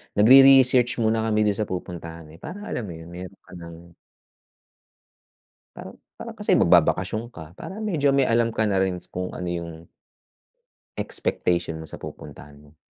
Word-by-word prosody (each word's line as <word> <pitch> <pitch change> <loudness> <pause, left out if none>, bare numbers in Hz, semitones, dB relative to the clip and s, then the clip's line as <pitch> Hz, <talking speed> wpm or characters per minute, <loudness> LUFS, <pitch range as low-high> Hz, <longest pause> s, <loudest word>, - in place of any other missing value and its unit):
Nagre-research 130 +2 +6
muna 110 0 +1
kami 110 -1 +1
dun 105 -2 0
sa 105 - -1
pupuntahan, 85 -2 -7
eh, 80 - -16
para 195 +6 -9
alam 115 -4 -4
mo 85 - -8
yun, 80 +1 -12
meron 90 +2 -9
ka - - -20
ng 85 -1 -12 1.8
Parang - - -11 0.2
parang - - -8
kasi - - +2
magbabakasyon 110 +6 +2
ka. 80 -1 -10
Parang 210 +3 -7
medyo 145 -9 +1
may 140 - +3
alam 115 -1 +2
ka 110 - +1
na 100 -3 +1
rin 95 -1 0 0.2
kung 90 0 -5
ano 90 -1 -5
yung 85 -1 -7 1.1
expectation 85 -2 -2
mo - - -10
sa - - -10
pupuntahan 75 0 -11
mo. 75 +1 -20
95 Hz, 160 wpm, -23 LUFS, 85-115 Hz, 1.8 s, Nagre-research